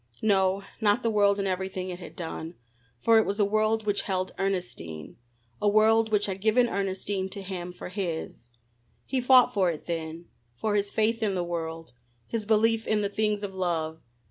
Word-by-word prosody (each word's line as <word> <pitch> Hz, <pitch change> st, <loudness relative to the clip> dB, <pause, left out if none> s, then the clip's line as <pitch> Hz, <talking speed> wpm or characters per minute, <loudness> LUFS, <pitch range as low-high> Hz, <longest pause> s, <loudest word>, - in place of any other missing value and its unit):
No, 195 Hz, -2 st, +2 dB, 0.2 s
not 210 Hz, +3 st, +3 dB
the 230 Hz, -, +1 dB
world 200 Hz, -1 st, +3 dB
and 200 Hz, -1 st, -1 dB
everything 185 Hz, 0 st, -3 dB
it 175 Hz, -, -7 dB
had 175 Hz, -, -10 dB
done, 165 Hz, 0 st, -6 dB, 0.5 s
for 225 Hz, -1 st, +6 dB
it -, -, +4 dB
was 200 Hz, +2 st, -2 dB
a 205 Hz, -, +5 dB
world 215 Hz, +1 st, +1 dB
which 205 Hz, -1 st, +1 dB
held 185 Hz, -1 st, -2 dB
Ernestine, 180 Hz, -, -3 dB, 0.5 s
a 210 Hz, -, +4 dB
world 220 Hz, +1 st, +4 dB
which 205 Hz, -1 st, +3 dB
had 195 Hz, -1 st, -3 dB
given 230 Hz, +3 st, +4 dB
Ernestine 195 Hz, -1 st, -2 dB
to 200 Hz, 0 st, -7 dB
him 180 Hz, -2 st, -5 dB
for 180 Hz, -, -8 dB
his. 170 Hz, -, -5 dB, 0.6 s
He 265 Hz, -2 st, -1 dB
fought 250 Hz, 0 st, +6 dB
for 190 Hz, -5 st, +3 dB
it 160 Hz, -3 st, -5 dB
then: 165 Hz, 0 st, -4 dB, 0.3 s
for 215 Hz, -, -1 dB
his 205 Hz, -1 st, +1 dB
faith 225 Hz, +2 st, +1 dB
in 205 Hz, -3 st, +1 dB
the 180 Hz, -, 0 dB
world, 165 Hz, -2 st, -5 dB, 0.3 s
his 215 Hz, -, -4 dB
belief 225 Hz, +1 st, +3 dB
in 215 Hz, -1 st, +2 dB
the 200 Hz, -, 0 dB
things 210 Hz, 0 st, 0 dB
of 195 Hz, -1 st, -4 dB
love. 165 Hz, -4 st, -2 dB
200 Hz, 190 wpm, -27 LUFS, 180-215 Hz, 0.6 s, for